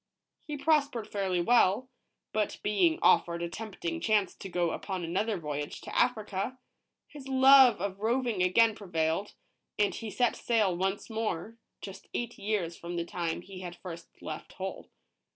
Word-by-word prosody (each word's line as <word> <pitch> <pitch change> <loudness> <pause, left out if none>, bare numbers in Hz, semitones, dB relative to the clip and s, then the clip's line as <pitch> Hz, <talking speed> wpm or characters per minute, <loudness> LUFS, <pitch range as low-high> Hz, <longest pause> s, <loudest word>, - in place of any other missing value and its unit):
He 300 -1 -4
prospered 285 -6 +1
fairly 190 -3 -1
well, 235 +3 +3 0.5
but 215 -1 -1
being 320 - +3
offered 170 0 +4
a 170 - -2
tempting 225 - -5
chance 210 - +2
to 195 - -9
go 175 -2 0
upon 190 -3 -4
another 200 +6 -1
voyage 150 -3 -4
to - - -8
Africa, 220 -1 0 0.5
his 280 -3 -11
love 265 -3 +7
of 195 +1 -3
roving 235 -2 0
again 220 +5 +4
prevailed, 175 -1 -2 0.4
and 205 -1 +2
he 225 - -5
set 245 +3 +1
sail 215 -6 +1
once 190 +3 -1
more, 220 0 -3 0.2
just 195 0 -9
eight 240 -2 -3
years 200 -5 -1
from 175 +1 -7
the 170 -1 -2
time 170 -1 -3
he 190 -1 -10
had 175 -1 -7
first 170 -2 -9
left - - -7
Hull. - - -6
205 Hz, 155 wpm, -30 LUFS, 175-235 Hz, 0.5 s, love